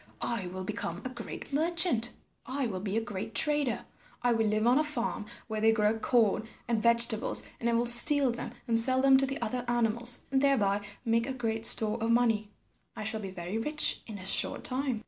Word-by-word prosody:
I 220 -6 -4
will 185 +1 -8
become 175 0 -6
a - - -4
great 245 +2 -10
merchant. 315 -6 +1 0.4
I 265 +1 -4
will 195 -5 -5
be 200 +2 -4
a - - -1
great 215 0 -8
trader. 295 -4 -1 0.4
I 245 - +1
will 225 -1 -1
live 215 +1 -1
on 250 +4 +2
a - - +1
farm 235 -7 -4 0.2
where 220 -1 -5
they 225 0 +3
grow 215 -1 0
corn 220 -2 0 0.2
and 230 -2 -2
vegetables, 235 0 +4 0.2
and 235 - -2
I - - -1
will 235 +1 0
steal 260 +3 +6
them 235 - -6 0.2
and 230 -1 +3
sell 255 +3 +3
them 270 -1 +4
to 270 - +1
the 275 +1 -5
other 245 +2 -4
animals 240 0 +1
and 265 -1 0
thereby 205 -8 0 0.2
make 230 +1 -1
a 265 - -4
great 225 -3 +2
store 220 +1 +4
of 225 - -2
money. 225 -3 0 0.5
I - - -7
shall 220 +1 -3
be 195 - -7
very 185 +3 -6
rich 300 +6 +4
in 215 -3 -9
a 185 - -11
short 195 - +1
time." 255 -2 -2
230 Hz, 210 wpm, -28 LUFS, 215-255 Hz, 0.5 s, steal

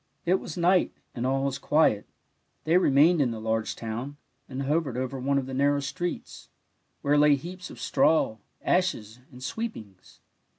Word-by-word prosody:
It 185 +2 +3
was 160 - -8
night, 180 +1 +3 0.2
and 125 +1 -2
all 135 +1 +1
was 140 -1 -2
quiet; 150 -9 +2 0.6
they 160 +2 +2
remained 155 +1 +4
in 130 - +2
the 115 -1 -5
large 110 0 -1
town, 120 +6 -5 0.3
and 135 +1 -4
hovered 145 -3 0
over 130 +1 -3
one 140 +2 +1
of 135 - 0
the 130 - -7
nar 140 +2 +3
row 145 - 0
streets, 175 +5 -5 0.5
where 145 +1 +3
lay 150 -1 +6
heaps 180 +6 -8
of - - -11
straw, 155 -8 +2 0.3
ashes, 125 - 0
and 125 0 -12
sweepings. 130 - -7
140 Hz, 170 wpm, -27 LUFS, 125-165 Hz, 0.6 s, lay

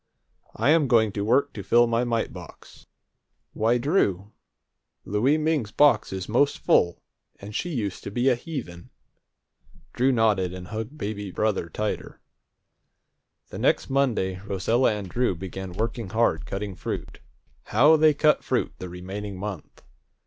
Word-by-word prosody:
I'm 145 +6 +3
going 110 -4 +3
to 100 0 -3
work 135 +6 +2
to 105 - -6
fill 120 +4 +4
my 115 +1 +1
mite 115 -2 -1
box. - - -13 0.7
Why, 115 +3 +2
Drew, 110 - 0 0.7
Louie 120 +9 +2
Ming's 155 -8 0
box 145 0 +3
is 95 -1 -5
most 135 +6 +2
full, 85 0 +2 0.4
and 100 +2 -9
she 175 - -2
used 110 - -3
to - - -3
be 120 +5 0
a 130 - +6
heathen!" 120 - -7 1.0
Drew 130 +2 +2
nodded, 105 -7 +1
and 90 -1 -9
hugged 110 +6 -5
baby 105 -4 -4
brother 95 -3 -1
tighter. 105 +3 -4 1.3
The - - -7
next - - +1
Monday 115 -9 +1
Rosella 105 +6 +1
and 105 -2 -5
Drew 120 0 0
began 95 +1 -7
working 115 +1 -3
hard 110 -7 +1
cutting 100 0 -4
fruit. 80 - -6 0.5
How 145 +9 +5
they 155 -1 +4
cut 150 +1 +3
fruit - - -1
the 90 - -6
remaining 95 +3 -6
month! 100 -3 -7
110 Hz, 145 wpm, -25 LUFS, 95-125 Hz, 1.3 s, a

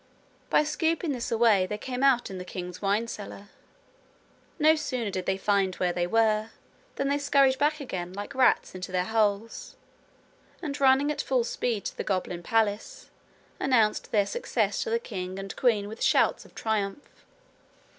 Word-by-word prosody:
By - - +4
scooping 320 +1 0
this 245 -4 -4
away 220 -5 +4
they 210 - -4
came 250 +3 -5
out 260 -6 +3
in 190 - -6
the - - -5
king's 180 0 -7
wine 205 +3 +1
cellar. 205 -2 -8 1.1
No 310 0 +5
sooner 255 -8 -3
did 185 -1 -4
they 190 - +1
find 195 -2 +1
where 180 -1 0
they 175 0 -1
were, 220 +1 +2 0.5
than 275 - -1
they 285 +1 +1
scurried 275 -2 +3
back 300 +1 +2
again, 180 -10 -5
like 205 +5 -7
rats 260 -1 +3
into 185 0 -6
their 180 -1 0
holes, 220 0 -1 0.8
and 290 -4 -5
running 270 +2 +4
at 300 - -2
full 255 -3 +1
speed 230 -2 -2
to - - -4
the - - -4
goblin 185 -3 -2
palace, 215 +2 -1 0.5
announced 230 -5 +2
their 205 -2 +3
success 485 - -1
to 465 - -2
the 460 - +2
king 185 - -6
and 195 0 -6
queen 215 -5 +2
with 220 +2 -9
shouts - - +2
of - - -19
triumph. 215 +3 -3
220 Hz, 170 wpm, -27 LUFS, 195-265 Hz, 1.1 s, No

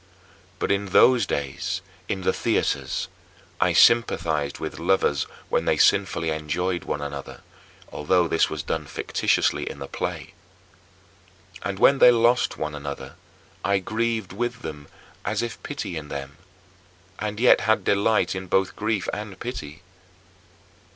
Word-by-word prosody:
But - - -1
in 100 0 0
those 115 +2 +5
days 70 -2 -3 0.3
in 95 - -2
the - - +1
theaters - - -1 0.5
I - - +3
sympathized 80 -11 +3
with - - -6
lovers 85 -7 +1 0.2
when - - 0
they - - +2
sinfully 80 -1 +3
enjoyed 85 +4 -2
one 75 - -3
another, 70 -1 -7 0.5
although 85 +3 +2
this 80 - +2
was 75 -2 -4
done - - -3
fictitiously - - 0
in - - -8
the 70 - -7
play. - - -5 1.3
And 100 -1 -3
when 135 +6 +5
they - - +9
lost 120 +1 +3
one 75 0 -3
another, 70 -1 -6 0.5
I 100 +2 +2
grieved 110 +1 -2
with 120 +1 -3
them, 75 -2 -7 0.4
as 105 +3 -1
if 120 - -5
pitying 85 - -5
them, 70 0 -7 0.8
and 105 0 -3
yet 125 - +6
had 110 +2 +2
delight 105 +2 +2
in 95 0 -5
both 95 0 +1
grief 105 -2 -1
and 105 -2 -6
pity. 85 - -7
95 Hz, 135 wpm, -24 LUFS, 75-110 Hz, 1.3 s, they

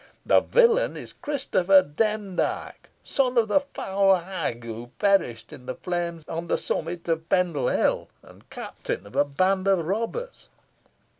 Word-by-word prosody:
The - - +6
villain 480 0 +3
is - - -8
Christopher 195 -10 +3
Demdike, 205 +4 -2
son 255 -2 0
of 225 -2 +3
the 290 - +5
foul 195 -8 +1
hag 175 -10 -4
who 115 +1 -7
perished 165 - +1
in 125 - -12
the - - -3
flames 170 -2 -3
on 165 +1 -4
the - - +1
summit 170 +1 -3
of 165 -1 -1
Pendle 175 -8 +1
Hill, - - +1
and - - -18
captain 95 - -5
of 100 - -13
a - - +5
band 185 +7 +1
of 190 -4 +3
robbers." 230 - -4
185 Hz, 150 wpm, -25 LUFS, 160-215 Hz, -, The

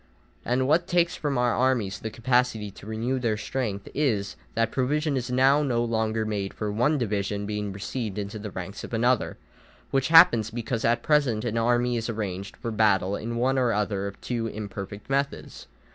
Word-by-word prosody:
And 130 +2 +1
what 165 +4 +3
takes 175 -1 +2
from 145 -3 -2
our 125 -1 +2
armies 120 -7 +1
the 110 - -4
capacity 115 -2 0
to 100 - -13
renew 115 +4 -1
their 115 -4 0
strength 105 -3 -3
is, 110 -9 0 0.2
that 115 0 +1
provision 145 +3 0
is 125 -2 -2
now 135 +3 +4
no 120 -5 +1
longer 110 -1 0
made 100 -2 -3
for 105 -1 -3
one 125 +9 +2
division 100 -4 -1
being 105 -1 -3
received 105 +1 -4
into 105 +1 -4
the 105 0 -6
ranks 95 +1 -7
of - - -4
another, 120 +1 +1 0.5
which 135 -1 +2
happens 120 -10 +7
because 115 0 -3
at 120 +1 +2
present 140 -8 +2
an 115 -2 -2
army 120 +1 +2
is 115 +1 -3
arranged 100 -3 -4
for 115 - -4
battle 100 -3 +2
in 115 +3 -4
one 130 +3 +1
or 120 -3 +2
other 100 -1 -1
of 100 - -8
two 115 -2 -2
imperfect 100 -1 -7
methods. 140 +1 -2
115 Hz, 185 wpm, -26 LUFS, 105-130 Hz, 0.5 s, happens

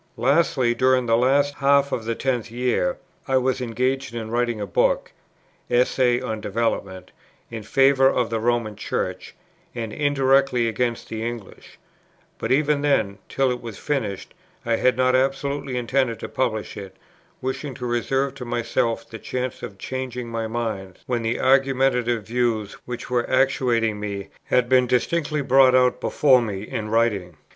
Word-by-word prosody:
"Lastly, 130 -1 +2
during 130 0 +2
the 115 -1 +3
last 140 +4 +3
half 140 0 +3
of 115 - -3
that 115 0 -2
tenth 125 -4 -1
year 125 - 0 0.3
I 135 -1 +3
was 130 0 0
engaged 125 +1 -1
in 110 -1 -5
writing 120 -1 0
a 105 - -2
book - - +1 0.6
(Essay 125 0 +2
on 110 -4 -4
Development) 100 -3 -2 0.4
in 115 -1 -5
favour 135 +4 +4
of 120 -3 0
the 115 - 0
Roman 115 -2 0
Church, 105 - -4 0.4
and 115 -3 -4
indirectly 135 -4 +2
against 120 +1 -2
the 110 0 -5
English; 115 -4 -7 0.6
but - - -2
even 145 +1 +2
then, 110 -9 +1
till 135 -1 +1
it 125 - -4
was 115 -4 -8
finished, 115 -10 -3 0.3
I 115 -1 +1
had 130 +2 +2
not 130 0 +3
absolutely 135 0 -1
intended 125 -1 0
to - - -4
publish 110 -5 -2
it, 95 -2 -9 0.4
wishing 130 +1 -4
to 125 - -6
reserve 130 +3 0
to 135 -2 -8
myself 120 -1 -1
the 115 - -9
chance 125 +2 -4
of 100 - -8
changing 125 +2 -5
my 115 -1 -3
mind 110 -5 -4
when 120 -2 -1
the 115 +1 -1
argumentative 130 -3 +2
views 115 -3 -1
which 120 0 -7
were 120 -1 0
actuating 125 -5 +1
me 100 -1 -5 0.2
had 125 -1 +2
been 125 0 +4
distinctly 150 +4 0
brought 130 0 +5
out 125 0 +3
before 130 -3 +4
me 100 -4 -4
in 110 0 -5
writing. 105 -7 0
125 Hz, 160 wpm, -23 LUFS, 115-130 Hz, 0.6 s, brought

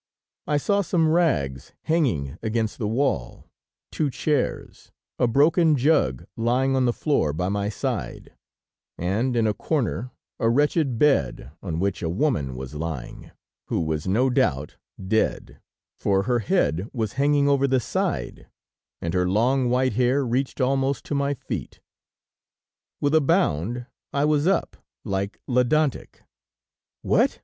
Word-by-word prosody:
I 150 - +2
saw 200 +7 +1
some 170 -4 +1
rags 70 - 0
hanging 115 - 0
against 110 -1 -2
the 105 - -1
wall, 115 - -1 0.5
two 150 -3 0
chairs, 145 +1 -2 0.3
a 125 - +3
broken 155 +6 +4
jug 125 - +2
lying 125 +4 +1
on 130 -1 +2
the 120 - +3
floor 120 - 0
by 90 +4 -1
my 100 0 -1
side, 105 - -4 0.6
and 110 +9 0
in 115 -2 +2
a 105 - +2
corner 125 0 -2 0.3
a 115 - +2
wretched 145 0 +2
bed 70 - +1
on 85 -4 -3
which 100 0 -1
a 80 - -1
woman 85 - 0
was 65 +1 -7
lying, 75 -5 -6 0.4
who - - -1
was 80 0 -2
no 125 +8 +2
doubt 75 - 0 0.3
dead, 110 +3 -1 0.4
for 95 -1 +1
her 120 +1 +1
head 90 - 0
was 110 -4 -3
hanging 145 +1 +2
over 140 -1 +3
the 130 -1 +2
side, 65 - -3 0.6
and 85 0 -2
her 90 -1 +1
long 125 +6 +2
white 130 0 +2
hair 130 +4 +2
reached 130 +4 -1
almost 135 +1 0
to - - -4
my 140 0 0
feet. - - -6 1.2
With 145 +1 +1
a 160 - +5
bound 120 - +1 0.3
I 140 +1 +1
was 150 +1 +2
up, 195 - 0 0.3
like 100 +1 -3
Ledantec. 130 +3 0 0.8
"What!" - - +2
125 Hz, 140 wpm, -24 LUFS, 95-140 Hz, 1.2 s, a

